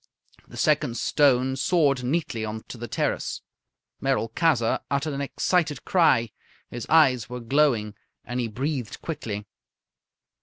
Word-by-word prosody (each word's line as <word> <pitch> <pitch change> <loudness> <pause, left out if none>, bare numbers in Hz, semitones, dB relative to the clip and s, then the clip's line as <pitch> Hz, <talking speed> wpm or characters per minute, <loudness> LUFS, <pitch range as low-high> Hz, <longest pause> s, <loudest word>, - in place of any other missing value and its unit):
The - - -12
second 115 - +1
stone 130 -3 +3
soared 140 -3 +2
neatly 130 -4 -1
on 110 0 -5
to - - -7
the 120 - -5
terrace. - - -2 0.6
Merolchazzar 130 0 +1
uttered 140 +2 -1
an 140 - -3
excited 150 +2 0
cry. 130 -11 +3 0.4
His 120 -1 -6
eyes 130 -7 +4
were 125 0 -5
glowing, 120 -4 +1 0.3
and 125 +2 -3
he 120 - 0
breathed 130 +1 -3
quickly. 110 -10 -4
130 Hz, 125 wpm, -25 LUFS, 115-150 Hz, 0.6 s, eyes